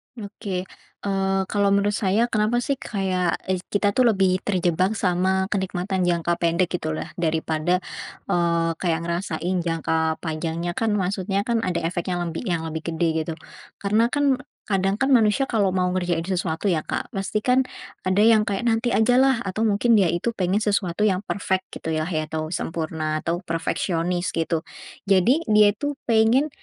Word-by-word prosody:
Oke. 200 -3 -5 0.4
Eee, 195 -1 0
kalau 200 -1 +2
menurut 200 +1 +2
saya, 205 +2 +1
kenapa 220 +3 +1
sih, 275 0 -1
kayak 185 -4 -1 0.2
eis 185 - 0
kita 205 0 +1
tuh 250 +3 +3
lebih 190 -3 +3
terjebak 185 +1 +1
sama 190 0 +1
kenikmatan 190 -1 -1
jangka 170 0 0
pendek 170 +1 +1
gitulah, 155 0 -4
daripada, 160 +2 0 0.5
eee, 170 -1 +2
kayak 165 -3 0
ngerasain 170 0 -2
jangka 160 -1 0
panjangnya 165 +2 -2
kan, 215 +3 0
maksudnya 195 +1 -1
kan 235 0 0
ada 175 -5 -1
efek 170 +1 -2
yang 175 -1 -1
lembi 170 +7 -4
yang 170 -3 -1
lebih 160 +1 -4
gede 170 +1 +1 0.2
gitu. 165 - -2 0.4
Karena 215 +4 +2
kan, 280 -1 +1 0.3
kadang 195 -1 +1
kan 270 +3 +1
manusia 235 +3 +4
kalau 205 -4 +2
mau 180 -1 +1
ngerjain 175 -3 0
sesuatu 180 -1 -2
ya 160 - +2
Kak, - - -4
pasti 195 +1 -2
kan, 255 +1 +4 0.5
ada 195 +3 +3
yang 220 -1 +5
kayak, 200 +2 -1
nanti 230 +1 +2
ajalah, 245 +2 +3
atau 195 +3 -3
mungkin 215 +3 +3
dia 190 - +4
itu 175 +8 -1
pengen 190 0 0
sesuatu 200 -2 0
yang 190 -3 +2
perfect 190 -2 -1
gitulah 160 0 -2
ya 155 -3 -1
atau 155 0 -4
sempurna, 160 -2 -2
atau 170 +2 -2
perfeksionis 175 +1 -1
gitu. 165 0 -1 0.4
Jadi, 200 - +3
dia 210 -1 +6
itu 290 +8 -2 0.2
pengen, 230 +6 +4
185 Hz, 160 wpm, -23 LUFS, 170-210 Hz, 0.5 s, dia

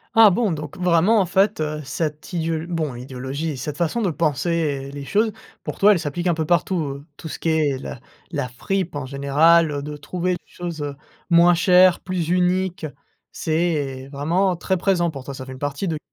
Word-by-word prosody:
Ah 225 -1 +9
bon! 205 +2 +1
Donc 150 -2 -5
vraiment 180 +4 +4
en - - +1
fait, 190 +1 +2
heu, 155 0 -2
cette 150 +4 -4
idéo 165 -1 -1
bon 160 -6 -2
idéologie, 135 +5 -4
cette 145 +3 -5
façon 175 +7 0
de 200 - +1
penser 150 -2 -1
les 140 0 -7
choses 215 +7 +1 0.3
pour - - -5
toi 210 +1 +7
elle 180 - 0
s'applique 170 +3 -3
un 175 - +3
peu 160 -1 -1
partout. 150 -4 0
Tout 160 - -8
ce - - -6
qui - - -3
est 155 -2 +2
l 130 - -7 0.3
la 140 -6 -2
fripe 180 +7 -2
en 145 - -4
général, 145 +3 +3
de 150 +1 -6
trouver 175 +5 -2
les 175 - -2
choses, 170 -3 -6
heu, 145 -1 -4 0.3
moins 170 0 +6
chères, 180 +1 +5
plus 185 -3 -2
uniques, 180 0 +1 0.5
c'est 150 -5 -1
vraiment 175 +6 +1
très 190 +2 0
présent 175 -2 +1
pour 135 -4 -8
toi. 140 - -7
Ça 130 -1 -7
fait 130 - -8
une 130 - -11
partie 145 +7 -3
de 160 - -1
160 Hz, 195 wpm, -22 LUFS, 145-180 Hz, 0.5 s, Ah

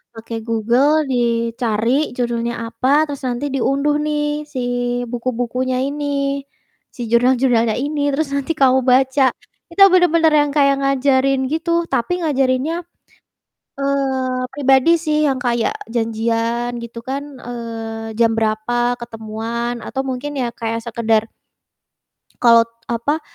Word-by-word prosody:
pakai 225 0 -6
Google 245 +8 +2
dicari 235 +2 0
judulnya 235 -1 -1 0.2
apa, 240 +3 -2 0.2
terus 280 - -5
nanti 245 +3 -2
diunduh 280 +3 +1
nih 300 -1 0 0.3
si 255 - -3 0.5
buku-bukunya 250 +1 -2
ini, 290 +1 -4 0.9
si 245 - -7
jurnal-jurnalnya 240 -2 +3
ini 295 0 -3
terus 295 0 -1
nanti 280 +3 -1
kamu 265 -2 +4
baca." 265 +1 +3 0.5
Kita 390 +4 +5
bener-bener 335 -3 +4
yang 295 -1 +4
kayak 275 -1 +4
ngajarin 275 0 +2
gitu, 335 +1 0
tapi 235 +9 0
ngajarinnya, 270 +2 +1 1.0
eee, 265 -2 -1
pribadi 270 +1 +3
sih 305 -1 +1
yang 265 - 0
kayak 240 -2 0 0.2
janjian, 230 +1 -1
gitu 235 0 -8
kan, 275 +1 -2 0.2
eee, 225 -2 -6
jam 230 -1 +4
berapa 240 +3 0
ketemuan 230 +1 -4
atau 265 - -4
mungkin 260 +3 -4
ya 245 - 0
kayak 230 0 -3
sekedar 225 -1 +1 1.1
kalau, 230 -1 +7 0.2
apa, 240 +7 -1
250 Hz, 120 wpm, -19 LUFS, 230-275 Hz, 1.1 s, kalau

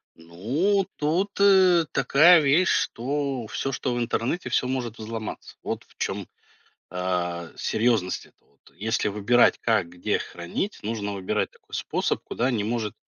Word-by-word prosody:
Ну, 125 - 0
тут, 170 +7 0
э, 190 -4 +6
такая 155 +6 +6
вещь, 150 +6 +3
что 135 -1 -1
всё, 135 - -3
что 125 -1 -2
в - - -2
интернете- 120 +7 -1
всё 125 - +1
может 125 -3 -3
взломаться. 110 0 -7
Вот - - -4
в - - -25
чём, - - -3 0.6
а, 90 -2 -2
серьезность 110 -5 0
эта - - -28
вот. - - -35 0.2
Если 110 +2 0
выбирать, 105 +4 +3
как, 110 -7 +1
где 90 +1 -1
хранить, 85 - -5
нужно 105 -1 -3
выбирать 95 -2 -2
такой - - -15
способ, - - -1
куда 125 +3 -1
не 110 -5 -1
может 110 -1 -2
120 Hz, 145 wpm, -25 LUFS, 100-145 Hz, 0.6 s, э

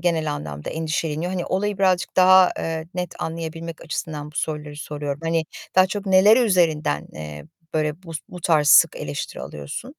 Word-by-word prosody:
genel 160 -3 0
anlamda 75 - -6
endişeleniyor? 160 +1 -2
Hani 180 -2 -2
olayı 200 +1 -1
birazcık 185 -3 +1
daha, 185 0 +7
eee, 160 -1 -3
net 180 -1 -4
anlayabilmek 165 0 -5
açısından 150 -2 -5
bu - - -12
soruları 150 -1 -3
soruyorum. 145 -1 -5
Hani 165 0 0 0.3
daha 185 0 +6
çok 200 +1 -5
neleri 195 +4 +6
üzerinden, 165 - +1
eee, 75 -1 -8 0.3
böyle 155 +2 -1
bu 165 -3 -10 0.2
bu 180 - -9
tarz 155 -3 +3
sık - - +7
eleştiri 75 -1 -5
alıyorsun? 75 - -7
165 Hz, 160 wpm, -23 LUFS, 150-185 Hz, 0.3 s, daha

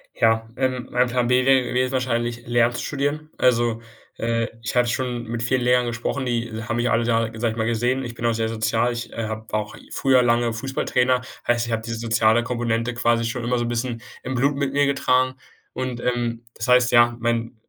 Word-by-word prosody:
Ja, 115 0 +2
ähm, 130 -1 -1
mein 125 0 +3
Plan 120 0 0
B 125 +1 +3
wäre 135 -1 +5
gewesen 125 +1 0
wahrscheinlich 120 -2 -1
Lehramt 120 0 +2
zu - - -4
studieren. 145 +2 -2
Also, 120 -2 +2 0.4
äh, 115 0 0 0.2
ich 120 - -4
habe 125 -1 +3
schon 120 -1 -2
mit 115 0 -3
vielen 125 +2 +1
Lehrern 125 0 +3
gesprochen, 120 +3 -2
die 120 -2 -1
haben 115 +1 -2
mich 120 +1 +1
alle 115 0 +2
Jahre, 115 -1 +1
sage 115 -1 +1
ich 115 - -7
mal, 110 0 0
gesehen. 120 +3 0
Ich 120 -1 -7
bin 120 - -5
auch 115 - +3
sehr 110 0 -1
sozial. 115 +2 0
Ich, 120 0 -6
äh, 115 -1 -3
habe 110 0 -5
auch 105 0 -2 0.2
früher 130 -2 +3
lange 120 -1 +2
Fußballtrainer 125 0 0 0.3
heißt, 120 0 +2
ich - - -4
habe 110 0 -1
diese 115 -1 -4
soziale 115 0 +3
Komponente 115 -1 -1
quasi 120 -1 +2
schon 120 +1 -3
immer 125 +1 0
so 120 - -1
'n - - -2
bisschen 120 -1 -2 0.2
im 130 - -3
Blut 140 +3 +2
mit 140 -1 -1
mir 145 0 +3
getragen. 130 -2 +2 0.4
Und, 125 -2 -4
ähm, 120 -1 -1
das - - -4
heißt, 125 0 +5
ja, 120 0 +5
mein 115 0 -1
120 Hz, 215 wpm, -23 LUFS, 115-125 Hz, 0.4 s, wäre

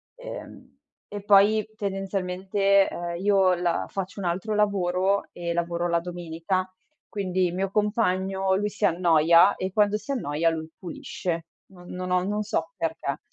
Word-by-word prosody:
Ehm, - - -10 0.3
e 205 -1 -7
poi, 205 +1 +5
tendenzialmente, 195 0 +1
uhm, 175 0 -4
io 195 -1 +3
la 175 -1 0
faccio 195 +1 -5
un 195 - -4
altro 190 +5 -1
lavoro 195 -1 +1
e 170 -1 -4
lavoro 170 0 -1
la 170 -1 +2
domenica, 175 +1 -3 0.4
quindi 185 -3 -1
il 175 - -5
mio 195 +1 -1
compagno, 195 -3 +1
lui, 205 +2 0
si 205 - -9
annoia 170 +2 +5
e 185 +1 -3
quando 210 +1 +2
si 215 +6 -7
annoia, 165 - 0
lui 160 -1 -4
pulisce. 170 -1 -5 0.2
Non 180 -2 -15
non 180 0 -5
ho 180 0 +2
non 210 +2 -1
so 210 - -2
perché. - - -3
185 Hz, 155 wpm, -25 LUFS, 175-200 Hz, 0.4 s, poi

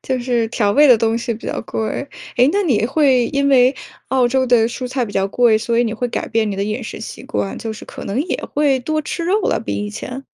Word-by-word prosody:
就 260 -1 -1
是 240 -2 0
调 210 -3 +1
味 295 +6 +6
的 250 - +8
东 225 +1 +1
西 235 0 -3
比 220 - -10
较 - - -3
贵。 220 +5 -3 0.3
诶， 250 - +5
那 405 +1 +2
你 230 - +1
会 265 -3 +3
因 280 +1 0
为 260 0 +5 0.3
澳 260 -2 +3
洲 260 +1 +1
的 240 -2 +4
蔬 250 +1 -5
菜 255 -1 -1
比 205 - -9
较 195 0 +1
贵， 230 0 +3
所 230 +1 -1
以 240 - +3
你 225 - -2
会 245 +2 -2
改 - - -3
变 220 -2 0
你 195 - -4
的 200 - -1
饮 215 +4 -3
食 220 - -7
习 225 - -8
惯， 105 -2 -3
就 225 - -4
是 215 - -10
可 - - -9
能 205 +7 -1
也 350 - -2 0.2
会 285 -2 +3
多 310 +4 -1
吃 335 +3 -4
肉 395 +5 +2
了， - - 0
比 - - -4
以 205 - -5
前？ 255 +5 -7
245 Hz, 285 characters per minute, -19 LUFS, 220-265 Hz, 0.3 s, 的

